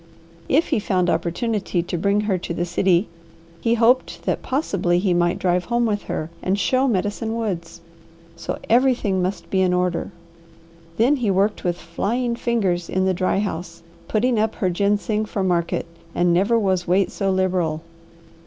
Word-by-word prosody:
If 305 +5 +3
he - - +2
found 185 -3 +1
opportunity 185 +2 -1
to 175 - -4
bring 200 +4 +1
her 200 -3 0
to 170 - -5
the 175 - -1
city, 175 +2 +2 0.5
he 230 +4 +2
hoped 240 +3 +2
that - - -1
possibly 195 - 0
he 185 0 +1
might 175 +1 +2
drive 180 -1 +1
home 240 0 +1
with 205 -2 0
her 155 +1 -4
and 190 +2 0
show 260 +6 +2
Medicine 220 +1 -1
Woods, 170 -7 -4 0.5
so - - -4
everything 235 -6 +2
must 185 +1 -3
be 190 - +2
in 185 -1 +2
order. 180 -1 -1 0.9
Then 255 +6 +3
he 235 -5 0
worked 195 +2 +1
with 175 -1 0
flying 235 +8 -2
fingers 195 -8 -1
in 185 0 +1
the 190 - +2
dry 185 +1 0
house, 175 -4 -4 0.2
putting 230 +1 +1
up 220 0 0
her 185 -3 0
ginseng 205 +3 0
for 205 -2 -3
market, 175 -2 0 0.3
and 175 0 +3
never 200 +7 +3
was 190 -4 0
weight 185 +2 +2
so 195 - -1
liberal. 180 -4 0
190 Hz, 170 wpm, -22 LUFS, 175-220 Hz, 0.9 s, If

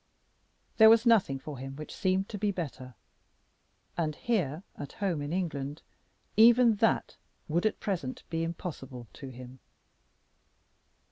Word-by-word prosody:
There 220 -1 +9
was 230 +1 +5
nothing 210 - +4
for 140 0 -8
him 135 +1 -7
which 150 +1 -8
seemed 190 +1 0
to 205 - -6
be 205 +1 +1
better. 135 - -6 1.0
And 155 -3 -1
here 180 - -1
at 145 - -8
home 185 -7 -2
in 145 +1 -4
England 155 -5 -3 0.5
even 230 0 +6
that 225 +1 +1 0.3
would 170 +7 +1
at 215 - -3
present 165 -11 -3
be 165 0 -1
impossible 145 -7 -6
to 135 - -9
him. 125 +1 -11
165 Hz, 135 wpm, -29 LUFS, 135-205 Hz, 1.0 s, There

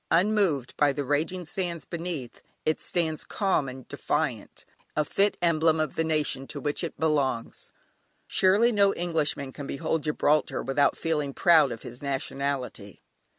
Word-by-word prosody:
Unmoved 180 - +2
by 145 -1 +4
the 145 +1 -3
raging 155 +6 -1
seas 170 -2 -3
beneath, 165 -7 -5 0.2
it 155 - 0
stands 160 -4 -1
calm 190 -9 0
and 130 0 -10
defiant, 140 -5 -3 0.3
a 150 - +1
fit 200 +5 +1
emblem 160 -1 +3
of 155 - -1
the 165 - 0
nation 150 -4 0
to 145 - -5
which 145 +4 -2
it 170 - -4
belongs. 145 -7 0 0.6
Surely 205 +6 +4
no 200 -2 +3
Englishman 155 -5 -1
can 140 -2 -7
behold 155 +3 -1
Gibraltar 150 0 +1
without 140 +1 +2
feeling 150 -4 -1
proud 160 -6 +5
of 115 - -7
his 120 +2 -9
nationality. 135 -6 -3
155 Hz, 150 wpm, -27 LUFS, 140-170 Hz, 0.6 s, proud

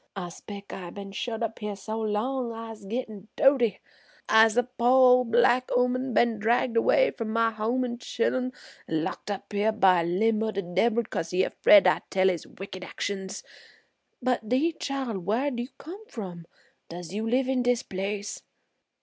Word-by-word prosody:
I 180 -3 -5
'spec' 200 +3 -10
I 180 -2 -7
been 200 +2 -8
shut 225 +3 -4
up 225 -1 -4
her 210 -1 -4
so 215 +3 -5
long 230 +4 -1
I'se 225 -2 -8
gittin' 215 -2 -5
doaty. 265 -5 +3 0.5
I'se 220 +1 +5
a 245 - +5
po' 250 +1 +5
ol'black 245 +1 +3
'ooman, 250 +1 +1
been 235 -2 +3
dragged 235 +2 +1
'way - - +4
from 230 -2 -5
my 230 +1 +2
home 225 +4 -1
an' 240 -1 -5
chillun 255 +1 -1 0.4
an' 160 -1 -1
locked 195 - -5
up 205 +1 -5
here 205 +2 +2
by 190 -5 +4
a - - -1
limb 210 +6 +1
o' 220 - 0
de 200 -2 -3
debbil 215 +7 +1
'cause 165 -6 -4
he's 185 +1 +1
'fraid 200 -2 +8
I 185 - +3
tell 190 0 +3
his 175 -3 -3
wicked 190 -1 -9
actions. 195 -1 -5 0.8
But 245 -4 0
'deed 310 +7 +1
chile, 265 -7 -3
whar'd 235 +8 -1
you 240 - -3
come 380 +7 -10
from? 175 -6 -8 0.4
Does 175 0 -8
you 220 +2 -2
live 255 +2 +2
in 260 -1 +1
dis 245 0 +1
place?" 200 +2 -4
225 Hz, 175 wpm, -27 LUFS, 200-245 Hz, 0.8 s, fraid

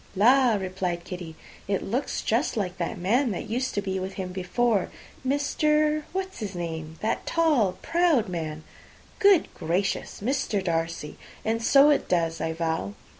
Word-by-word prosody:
"La!" 245 +3 +5
replied 185 -3 -2
Kitty, 175 -3 -7 0.3
"it 195 -1 0
looks 250 +7 -2
just 235 +3 0
like 185 -3 -2
that 175 +5 -2
man 235 +9 +2
that 195 - -4
used 250 +4 -2
to 205 - 0
be 190 -1 -2
with 190 +1 -4
him 190 -1 -4
before. 195 +4 0 0.3
Mr. 300 +2 +1
what's 380 +1 -4
his 205 -4 -5
name 160 -2 -5
that 220 - -1
tall, 300 - +3
proud 330 -8 +3
man." 160 -3 -4 0.6
"Good 400 -5 +5
gracious! 180 +4 -2
Mr. 230 -4 -1
Darcy! 165 -3 -2 0.3
and 225 +1 0
so 280 +5 +6
it 290 - +1
does, 165 -2 +1
I 160 - -1
vow. 160 - -2
200 Hz, 155 wpm, -26 LUFS, 175-265 Hz, 0.6 s, so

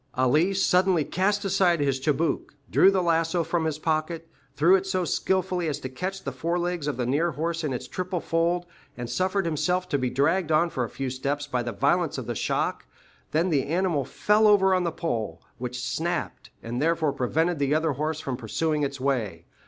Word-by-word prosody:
Ali 150 +10 +3
suddenly 185 -3 +3
cast 200 +3 0
aside 190 -3 +3
his 140 -2 +1
chibouque, 150 +2 -1 0.2
drew 190 - +6
the 190 -2 +1
lasso 165 0 +1
from 165 0 -1
his 155 -2 -1
pocket, 160 +1 -2 0.3
threw 165 +6 +5
it 195 0 0
so 185 -2 0
skilfully 185 -1 0
as 150 -2 -1
to 130 - -6
catch 185 +8 -5
the 135 - -3
forelegs 170 +3 -2
of 145 - -2
the 125 - -1
near 150 +7 +1
horse 165 +2 -2
in 150 - -1
its 125 - -4
triple 185 -1 -3
fold, 170 +2 0 0.3
and 120 -1 -5
suffered 190 +1 0
himself 175 +3 0
to 145 -5 +1
be 125 -1 0
dragged 160 +6 +1
on 165 +2 +3
for 125 - -1
a 115 - -4
few 135 -2 -4
steps 140 +3 -2
by 125 -4 -1
the 120 0 -3
violence 100 - +1
of - - -4
the - - -3
shock, - - -1 0.4
then 170 +4 +1
the 140 -4 +1
animal 170 -2 +1
fell 210 +10 +2
over 190 -2 +5
on 185 -1 +1
the 170 - 0
pole, 115 - -3 0.2
which 125 0 -4
snapped, 170 +5 -3
and 120 +2 -3
therefore 160 -2 +1
prevented 160 +6 0
the 140 +1 +2
other 160 0 +1
horse 155 +3 -2
from 135 -4 -3
pursuing 150 +6 -1
its 140 -1 -2
way. 115 -11 -1
160 Hz, 200 wpm, -26 LUFS, 140-180 Hz, 0.4 s, drew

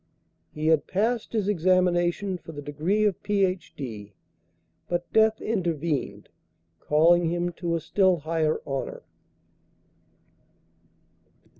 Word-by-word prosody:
He 155 0 -5
had 160 -2 +3
passed 225 +4 -1
his 215 -4 -1
examination 185 0 +1
for 165 - -11
the 145 - -7
degree 165 +9 0
of 200 -4 0
Ph.D., 150 - -2 0.8
but 175 0 -3
death 220 0 +4
intervened, 170 -8 -2 0.5
calling 165 +3 +3
him 175 +1 -1
to 170 -1 0
a - - 0
still 185 +2 +2
higher 160 0 0
honor. 135 -1 -4
175 Hz, 105 wpm, -26 LUFS, 155-195 Hz, 0.8 s, death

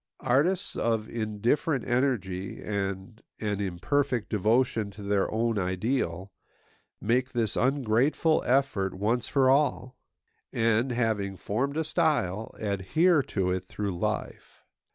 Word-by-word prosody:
Artists 150 +9 +2
of 110 -2 0
indifferent 120 - -1
energy 105 -8 -1
and 100 +1 -4 0.2
an 105 -2 -2
imperfect 105 +7 -1
devotion 110 +1 +1
to 100 +1 -11
their 100 -1 +1
own 115 -1 0
ideal 95 -1 -1 0.7
make 125 +4 0
this 115 -4 0
ungrateful 135 +4 +2
effort 120 -8 +1
once 115 +5 0
for 135 -2 +3
all; 130 -2 +2 0.6
and, 115 +3 +1
having 110 -5 -1
formed 135 +11 -2
a 160 - +1
style, 145 - 0
adhere 110 - +2
to 95 -7 -1
it 95 0 -2
through 100 0 -4
life. 85 - -4
115 Hz, 115 wpm, -28 LUFS, 100-130 Hz, 0.7 s, for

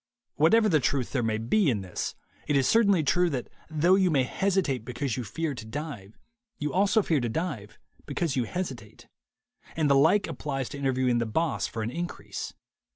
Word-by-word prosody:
Whatever 215 +9 +4
of 150 - +4
truth 130 -1 0
there 130 - 0
may 110 -1 0
be 145 - +2
in 110 -6 0
this, 95 -2 -4 0.3
it 145 - +1
is 135 -1 +3
certainly 200 -7 +4
true 175 +5 +3
that 130 -6 -4 0.2
though 160 +4 +3
you 190 -1 +4
may 140 -5 +3
hesitate 175 - 0
because 125 +1 -3
you 125 - -3
fear 155 - -3
to 120 - -7
dive, 110 -4 -7 0.4
you 150 0 -3
also 200 +3 +3
fear 160 -5 +2
to 120 -2 -1
dive 110 - -4 0.3
because 150 0 -1
you 125 -3 +1
hesitate; 130 - -6 0.7
and 155 -3 +2
the - - +6
like 160 +9 +4
applies 135 -4 -4
to - - -7
interviewing 130 -3 +1
the 115 - -1
boss 160 +7 0
for 110 - -4
an 115 - -3
increase. 175 +5 -5
140 Hz, 190 wpm, -27 LUFS, 120-170 Hz, 0.7 s, the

